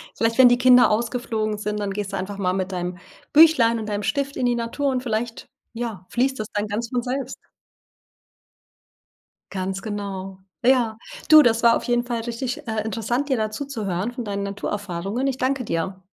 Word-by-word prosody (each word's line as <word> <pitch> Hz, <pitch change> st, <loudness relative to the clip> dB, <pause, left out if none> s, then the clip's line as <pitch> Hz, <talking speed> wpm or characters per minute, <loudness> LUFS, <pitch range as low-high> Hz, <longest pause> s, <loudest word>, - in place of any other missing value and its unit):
Vielleicht, 230 Hz, +1 st, 0 dB
wenn 250 Hz, -1 st, +9 dB
die 245 Hz, -, +4 dB
Kinder 250 Hz, 0 st, +6 dB
ausgeflogen 220 Hz, -1 st, -1 dB
sind, 210 Hz, 0 st, -3 dB
dann 200 Hz, -1 st, -2 dB
gehst 200 Hz, 0 st, -4 dB
du -, -, -1 dB
einfach 195 Hz, +2 st, -5 dB
mal 185 Hz, -1 st, +1 dB
mit 190 Hz, 0 st, -2 dB
deinem 180 Hz, 0 st, -4 dB, 0.4 s
Büchlein 290 Hz, -8 st, +6 dB
und 215 Hz, -, -5 dB
deinem 205 Hz, 0 st, -2 dB
Stift 280 Hz, +4 st, -1 dB
in 250 Hz, -, -1 dB
die 240 Hz, 0 st, +2 dB
Natur 235 Hz, +5 st, -2 dB
und 255 Hz, -1 st, -1 dB
vielleicht, 230 Hz, 0 st, -3 dB, 0.3 s
ja, 225 Hz, -6 st, -5 dB
fließt 265 Hz, 0 st, 0 dB
das 215 Hz, -, -3 dB
dann 205 Hz, 0 st, -1 dB
ganz 225 Hz, +3 st, -3 dB
von 245 Hz, -2 st, -1 dB
selbst. 260 Hz, +2 st, -4 dB, 2.1 s
Ganz 190 Hz, 0 st, -3 dB
genau. 195 Hz, -3 st, -5 dB, 0.3 s
Ja. 240 Hz, -4 st, +3 dB, 0.3 s
Du, 310 Hz, -1 st, +10 dB
das 230 Hz, -1 st, +3 dB
war 230 Hz, 0 st, +6 dB
auf -, -, -8 dB
jeden 240 Hz, 0 st, +1 dB
Fall 240 Hz, -2 st, -3 dB
richtig, 245 Hz, +4 st, -5 dB
äh, 220 Hz, -1 st, -1 dB
interessant, 230 Hz, +6 st, -2 dB
dir 260 Hz, -, +2 dB
da 215 Hz, -1 st, -1 dB
zuzuhören 215 Hz, -6 st, -3 dB
von 245 Hz, -2 st, -6 dB
deinen 200 Hz, -1 st, -3 dB
Naturerfahrungen. 200 Hz, +3 st, -3 dB
Ich 265 Hz, -1 st, -1 dB
danke 260 Hz, 0 st, 0 dB
dir. 190 Hz, +1 st, -3 dB
225 Hz, 185 wpm, -23 LUFS, 200-245 Hz, 2.1 s, Du